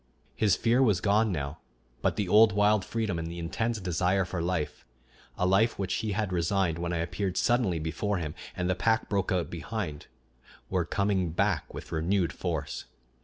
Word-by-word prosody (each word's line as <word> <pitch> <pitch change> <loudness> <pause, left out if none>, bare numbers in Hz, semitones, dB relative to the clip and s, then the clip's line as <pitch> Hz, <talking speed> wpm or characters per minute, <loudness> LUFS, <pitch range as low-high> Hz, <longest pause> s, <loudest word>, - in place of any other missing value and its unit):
His 105 -3 +3
fear 120 +3 +2
was 105 -8 +4
gone 105 +2 +3
now, 75 -2 -3 0.4
but - - +1
the 105 - -1
old 105 +2 +6
wild 105 0 +3
freedom 110 -7 -2
and 80 - -4
the 85 - -7
intense 110 +7 -2
desire 90 +1 +1
for 90 -1 -3
life 85 -3 -2 0.5
a 90 - +1
life 100 +5 +3
which 95 -1 -2
he 110 -2 -2
had 105 -2 -1
resigned 85 -1 +1
when 85 0 -2
I 85 - -1
appeared 90 +3 -2
suddenly 120 -8 +2
before 80 +6 -1
him, 80 -4 -4 0.2
and 90 - -1
the 95 - +2
pack 110 +5 +1
broke 100 -3 0
out 90 -2 0
behind 85 -3 -5 0.6
were 90 -3 +1
coming 100 -1 0
back - - 0
with - - -9
renewed 85 +3 +1
force. - - -3
95 Hz, 180 wpm, -29 LUFS, 85-105 Hz, 0.6 s, old